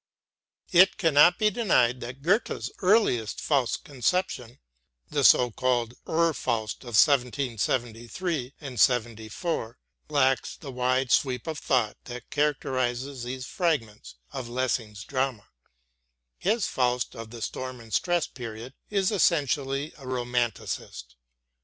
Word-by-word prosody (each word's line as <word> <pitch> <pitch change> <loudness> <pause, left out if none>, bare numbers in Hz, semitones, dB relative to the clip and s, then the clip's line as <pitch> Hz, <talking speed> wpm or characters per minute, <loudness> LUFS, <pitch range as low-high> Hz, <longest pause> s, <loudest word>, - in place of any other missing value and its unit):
It 185 +2 +6
cannot 165 -2 +5
be 215 -1 +2
denied 125 - +2
that 125 +3 -8
Goethe's 200 +8 0
earliest 185 - +2
Faust 135 -5 0
conception, 130 -3 -2 0.5
the - - 0
so 125 -1 +6
called 120 0 0 0.2
Ur 165 0 +2
Faust 115 -6 -2
of 120 -3 -5
1773 125 - 0
and 135 -6 -7
'74, 115 - 0 0.3
lacks 135 -3 +1
the 140 - -8
wide 125 0 0
sweep 125 -3 +2
of 155 -2 -4
thought 120 -6 +1
that 125 -1 -9
characterizes 135 -3 -1
these 130 +2 -5
fragments 130 - -2 0.2
of 130 -3 -6
Lessing's 120 -4 -2
drama. 130 -5 -2 0.9
His 215 +3 +1
Faust 125 -1 0
of 115 -1 -8
the 115 -1 -7
Storm 130 +2 -5
and 115 -2 -12
Stress 175 - +1
period 115 0 -8 0.2
is 200 -1 +1
essentially 145 - +1
a 135 - -11
Romanticist. 120 - -3
130 Hz, 120 wpm, -27 LUFS, 120-150 Hz, 0.9 s, It